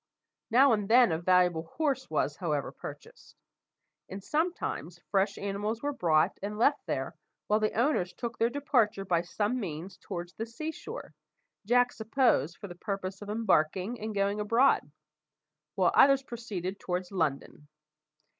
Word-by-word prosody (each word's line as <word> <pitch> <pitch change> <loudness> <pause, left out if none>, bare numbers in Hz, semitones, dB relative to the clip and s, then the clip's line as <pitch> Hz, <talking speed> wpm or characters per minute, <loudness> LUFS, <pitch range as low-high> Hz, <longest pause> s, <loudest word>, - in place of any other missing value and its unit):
Now 255 +2 +6
and 210 -2 -1
then 240 -3 +6
a 160 - 0
valuable 180 -2 +3
horse 280 -5 0
was, 150 -2 0
however, 150 -6 -2
purchased; - - -11 0.7
and 195 +1 -7
sometimes 300 - -2
fresh 195 0 +1
animals 205 +4 -3
were 290 0 -1
brought 165 - +2
and 205 +2 -4
left 280 +6 +2
there - - -2 0.3
while 210 +1 +2
the 215 0 0
owners 235 -9 +1
took 235 -1 -6
their 230 - +3
departure 240 -7 +1
by 175 -3 +2
some 205 +7 -1
means 175 -2 -6
towards 175 -3 -7
the 225 - -5
sea 310 +8 -5
shore, 290 - -9 0.5
Jack 245 +1 +4
supposed 220 - +1
for 205 - -8
the 175 - -8
purpose 195 +1 -5
of 205 - -8
embarking 205 0 +1
and 215 0 -5
going 200 +1 +1
abroad; 230 - +3 0.8
while 185 -3 +3
others 275 0 +6
proceeded 200 -7 -5
towards 180 0 -3
London. 150 -4 -2
205 Hz, 150 wpm, -29 LUFS, 180-235 Hz, 0.8 s, Now